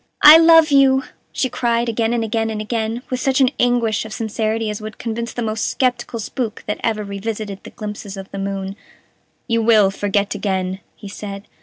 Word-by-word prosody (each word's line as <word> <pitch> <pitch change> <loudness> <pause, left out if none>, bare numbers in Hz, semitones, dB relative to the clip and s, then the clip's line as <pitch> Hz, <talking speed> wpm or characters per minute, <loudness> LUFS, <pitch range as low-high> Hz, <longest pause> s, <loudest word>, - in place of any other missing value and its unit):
"I 305 +2 +11
love 325 -2 +6
you," 270 -1 +5 0.3
she 260 - 0
cried, 240 -1 0
again 230 0 0
and 235 -1 0
again 225 0 -1
and 215 -1 -4
again, 225 +2 -3
with 255 - -1
such 265 0 +1
an 260 -2 +4
anguish 240 -3 +1
of 220 - -9
sincerity 220 0 -2
as 210 - -6
would 215 0 -8
convince 235 0 -4
the 240 - -4
most 220 0 -1
skeptical 245 -2 -1
spook 225 +1 -4
that 210 - -3
ever 215 -2 0
revisited 200 0 -5
the - - -9
glimpses 210 -1 -7
of 195 0 -9
the 195 - -6
moon. 195 0 -4 0.7
"You 230 -2 +1
will 215 -3 +4
forget 200 0 -1
again," 190 -2 -2 0.2
he 205 - -11
said. 200 0 -8
220 Hz, 190 wpm, -19 LUFS, 205-240 Hz, 0.7 s, I